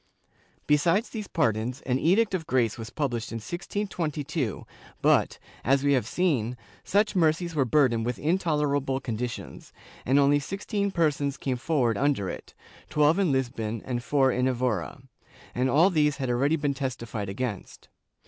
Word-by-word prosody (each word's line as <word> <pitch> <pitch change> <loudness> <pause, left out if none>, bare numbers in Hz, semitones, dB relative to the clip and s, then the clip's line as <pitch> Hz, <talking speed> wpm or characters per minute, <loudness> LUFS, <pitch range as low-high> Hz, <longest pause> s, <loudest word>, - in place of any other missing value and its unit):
* - - -34 0.2
Besides 165 - +2
these 215 -4 -5
pardons 120 - 0
an 130 0 0
Edict 195 +7 +3
of 170 -4 -2
Grace 120 -4 +1
was 115 -1 -7
pubhshed 120 -4 -3
in - - -5
1622 155 - -3 0.3
but, - - +3 0.3
as 135 +2 +2
we 140 0 +3
have 125 -6 +1
seen, 125 -8 0 0.3
such 205 +1 +1
mercies 170 0 +2
were 145 -4 +2
burdened 125 -4 +3
with 120 +1 -2
intolerable 150 -5 0
conditions, 120 -1 -5 0.3
and 135 +3 +2
only 145 +1 +4
sixteen 200 +6 -2
per 170 -5 +2
sons 140 -1 -3
came 130 -2 -2
forward 125 -5 0
under 135 -10 +1
it - - -10 0.2
— - - -23
twelve 150 +4 +3
in 185 -6 +2
Lisbon 115 -4 -2
and 120 -2 -3
four 135 -1 +3
in 125 +1 +1
Evora 120 - -2 0.2
— - - -23
and 125 +1 +1
all 165 +9 +5
these 150 -3 +2
had 130 -3 -1
already 140 +6 +2
been 145 -3 -1
testified 120 -7 -4
against. 105 -1 -5
140 Hz, 165 wpm, -27 LUFS, 120-160 Hz, 0.3 s, all